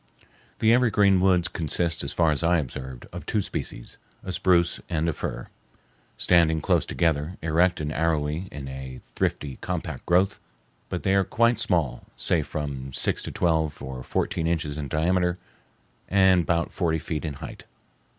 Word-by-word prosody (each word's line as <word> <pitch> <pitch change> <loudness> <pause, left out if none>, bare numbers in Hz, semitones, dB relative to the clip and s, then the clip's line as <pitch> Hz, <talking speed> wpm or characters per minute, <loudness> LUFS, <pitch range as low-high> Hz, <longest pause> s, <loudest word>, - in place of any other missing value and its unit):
The 115 +1 +4
evergreen 105 -6 +4
woods 90 -2 +3
consist, 85 +1 -1
as - - 0
far 85 -2 +3
as 75 - -1
I 85 +1 +3
observed, 65 -3 -5
of - - -6
two 110 - +1
species, - - -5 0.3
a 95 - -4
spruce 90 -1 +2
and 80 -1 0
a 80 - +1
fir, - - -5 0.7
standing 80 -2 +4
close - - +1
together, 80 +1 0
erect 85 +3 +2
and 75 -1 -2
arrowy 80 +2 0
in 70 -2 -7
a 65 -1 -7 0.2
thrifty, 70 -3 -1
compact - - -4
growth; 95 +4 +3 0.5
but - - -3
they 95 - +2
are 100 0 +4
quite 115 +4 +2
small, 85 - 0
say 85 - +2
from 70 -3 -5
six - - 0
to - - -5
twelve 80 -3 0
or 65 -1 -6
fourteen 80 +5 -1
inches 80 -3 -1
in 75 -1 -4
diameter, 90 +5 +1 0.7
and 95 -3 +4
bout 85 -1 0
forty 80 -3 +1
feet 80 0 -4
in 75 -3 -3
height. - - -9
80 Hz, 160 wpm, -26 LUFS, 75-90 Hz, 0.7 s, The